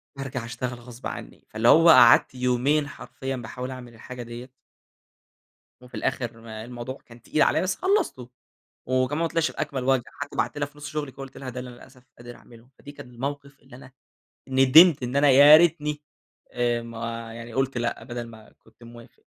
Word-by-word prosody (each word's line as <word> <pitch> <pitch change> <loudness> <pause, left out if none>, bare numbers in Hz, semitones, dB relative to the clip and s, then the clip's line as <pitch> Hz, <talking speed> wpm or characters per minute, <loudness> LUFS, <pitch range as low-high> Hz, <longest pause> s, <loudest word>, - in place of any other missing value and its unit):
بارجع 135 -3 -5
أشتغل 120 +1 -5
غصب 120 0 -9
عني. - - -9
فاللي 110 +2 -1
هو 165 +4 +7
قعدت 125 -2 +7
يومين 125 +4 +1
حرفيًا 135 -1 -7
باحاول 125 +2 -7
أعمل 125 -2 -10
الحاجة 125 +2 -9
ديّة 120 +2 -9 1.3
وفي 125 - -13
الآخر 120 -3 -2 0.3
الموضوع 125 +2 -7
كان 115 -1 -16
تقيل 155 +4 -1
عليَّ، - - +3
بس 185 +1 -1
خلصته، 375 - -1 0.6
وكمان 130 +4 0
ما - - +1
طلعش 165 -1 0
بأكمل 130 -2 -4
وجه، 130 -2 +2
حتى 145 - -9
بعتّ 145 - -2
لها 145 - -1
في 145 +1 -20
نُص 150 0 -7
شغلي 150 -3 -5
ك - - -33
قُلت 135 -1 -10
لها 130 -2 -7
ده 125 +1 -6
اللي 125 - -8
أنا 120 - -13
للأسف 130 0 -17 0.2
قادر 120 0 -11
أعمله. 120 +1 -18
فدي 145 - -12
كان 125 -3 -12
الموقف 140 +2 -6
اللي 125 - -15
أنا 130 0 -15 0.6
ندمت 135 +4 +6
إن 125 +2 -4
أنا 140 0 +4
يا 145 +3 +9
ريتني 150 -3 +1 0.5
آآ 120 -1 0
ما 115 0 -7
يعني 115 0 -10
قُلت 135 0 -1
لأ، 120 -1 -3
بدل 120 -1 -6
ما 110 -1 -15
كنت 115 +1 -22
موافق. 115 0 -15
125 Hz, 185 wpm, -25 LUFS, 120-140 Hz, 1.3 s, يا